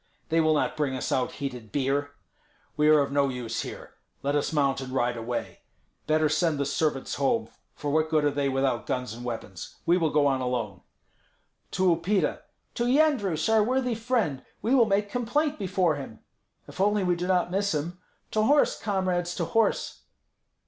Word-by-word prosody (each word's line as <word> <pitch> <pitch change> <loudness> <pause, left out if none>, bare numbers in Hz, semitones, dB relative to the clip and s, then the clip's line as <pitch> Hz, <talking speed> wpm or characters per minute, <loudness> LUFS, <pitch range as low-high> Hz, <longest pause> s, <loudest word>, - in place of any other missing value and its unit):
They 165 +1 +3
will 155 -1 +3
not - - 0
bring 145 -3 -1
us 130 - -3
out 130 -1 0
heated 125 -6 -6
beer. 145 +2 -1 0.6
We 150 0 +3
are 155 -1 +6
of 140 - -1
no 140 -1 +2
use 125 -3 -3
here; - - -8 0.3
let 140 +1 0
us 145 - 0
mount 140 -3 +1
and 130 -1 -6
ride 125 -2 0
away. 120 +1 -5 0.5
Better 155 0 +3
send 155 +1 +1
the 140 - 0
servants 140 -1 -1
home, 225 - +1 0.3
for 145 - -3
what 155 +1 +2
good 155 -2 +2
are 145 - +3
they 140 -1 0
without 130 -3 0
guns 125 -3 -2
and 120 +1 -9
weapons? 110 -7 -6
We 175 +2 +4
will 160 -2 +2
go 150 -1 +2
on 135 -2 +2
alone." 120 -7 -3 0.9
"To 185 -2 +3
Upita!" 185 +5 0 0.3
"To 240 - -1
Yendrus, 245 - +2
our 220 -1 +4
worthy 250 +1 0
friend! 225 - -1 0.2
We 235 - +1
will 250 -4 +6
make 205 0 0
complaint 285 +6 0
before 180 -5 +1
him." 130 -6 -9 0.5
"If - - -6
only 205 0 +2
we 180 -1 +2
do 175 +1 -3
not 180 -1 +1
miss 200 -2 0
him." 170 +5 -4 0.3
"To 215 - +1
horse, 285 +7 +3
comrades, 185 -3 -1
to - - -1
horse!" 225 -1 0
155 Hz, 185 wpm, -27 LUFS, 135-200 Hz, 0.9 s, are